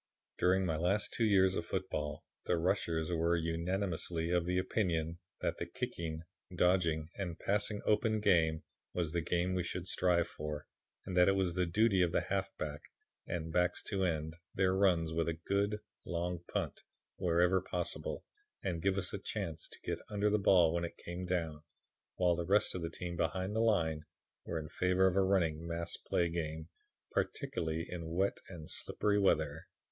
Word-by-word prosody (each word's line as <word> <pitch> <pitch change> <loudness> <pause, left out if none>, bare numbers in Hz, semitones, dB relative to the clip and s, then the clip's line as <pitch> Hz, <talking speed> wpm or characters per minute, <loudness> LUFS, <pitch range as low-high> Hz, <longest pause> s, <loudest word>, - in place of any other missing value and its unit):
"During 95 +1 +3
my 80 -3 0
last 95 +6 +1
two 115 - +2
years 95 -3 +5
of 85 - -2
football 75 -7 -3 0.2
the 90 - +2
'rushers' 85 -2 0
were 85 0 +2
unanimously 85 0 -1
of 90 -1 +2
the 90 0 +1
opinion 85 -4 0 0.2
that - - -1
the 85 - -3
kicking, 85 -8 -4 0.3
dodging 85 -3 +2
and 90 -4 -3
passing 105 +2 0
open 110 +1 +3
game 85 -6 +3 0.3
was 85 -3 0
the 85 0 0
game 85 +2 0
we 90 - +1
should 90 +1 -3
strive 90 -2 +2
for 75 -2 -5 0.4
and 95 - -4
that 90 0 +6
it 95 - +4
was 95 -3 +1
the 90 -1 +1
duty 100 +2 +3
of 85 -2 +3
the - - +3
halfback 95 -7 -3 0.5
and 80 -2 -3
backs 90 0 +2
to 95 -2 -1
end 80 -2 -1 0.2
their 95 -1 +3
runs 85 -5 +3
with 85 0 +1
a 80 - -1
good 100 +1 +1 0.3
long 85 0 -2
punt, - - -2 0.4
wherever 90 +1 +3
possible, 90 -1 -3 0.4
and 85 -3 -1
give 95 +1 +2
us 95 -2 0
a 100 - -2
chance 95 -6 -4
to - - -13
get - - -2
under 105 0 +1
the 105 - +3
ball 90 -4 +5
when 85 0 0
it 85 - -5
came 90 +1 -6
down, 80 -4 -1 0.5
while 90 -1 +3
the 85 - -2
rest 100 +3 +3
of 90 - -4
the 85 - -2
team 85 +1 -5
behind 95 +4 -1
the - - +2
line 85 -9 +2 0.4
were 85 - -3
in 75 -1 -4
favor 90 +3 +2
of 95 -1 +3
a 100 - +5
running 85 -4 +1
mass 85 0 -3
play 85 - 0
game, 80 -1 -4 0.4
particularly 80 0 -1
in 85 -2 -5
wet 95 +4 +1
and 85 -5 -8
slippery 105 -1 0
weather. 80 -5 +1
90 Hz, 180 wpm, -34 LUFS, 80-95 Hz, 0.5 s, that